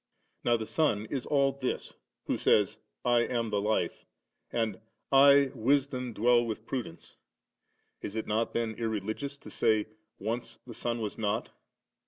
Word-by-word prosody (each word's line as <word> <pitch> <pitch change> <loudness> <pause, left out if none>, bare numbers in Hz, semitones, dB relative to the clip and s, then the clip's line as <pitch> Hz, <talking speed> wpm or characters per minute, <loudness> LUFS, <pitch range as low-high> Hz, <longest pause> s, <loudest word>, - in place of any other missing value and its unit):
Now 120 -1 +3
the 110 - -4
Son 110 -7 +1
is 135 -3 -3
all 140 -2 +3
this, 135 -2 -3 0.3
who - - 0
says, - - +3
* - - -39
I - - +6
am 120 -2 0
the 100 -1 +1
Life 105 -4 0 0.3
«<>,' - - -48
and, 110 -4 -1 0.2
' - - -50 0.2
I 140 -1 +6
Wisdom 130 0 +1
dwell 120 +2 +4
with 110 -1 -4
prudence 120 -12 -6 0.4
".* - - -47
Is 100 - -5
it 110 - -2
not 110 +2 0
then 115 -1 -1
irreligious 110 +5 -3
to - - -11
say, 110 -1 +2 0.2
* 110 +1 -50
Once 115 +4 -4
the 120 - -9
Son 120 +1 -2
was 105 0 -4
not 105 0 -1
115 Hz, 175 wpm, -30 LUFS, 110-125 Hz, 0.4 s, I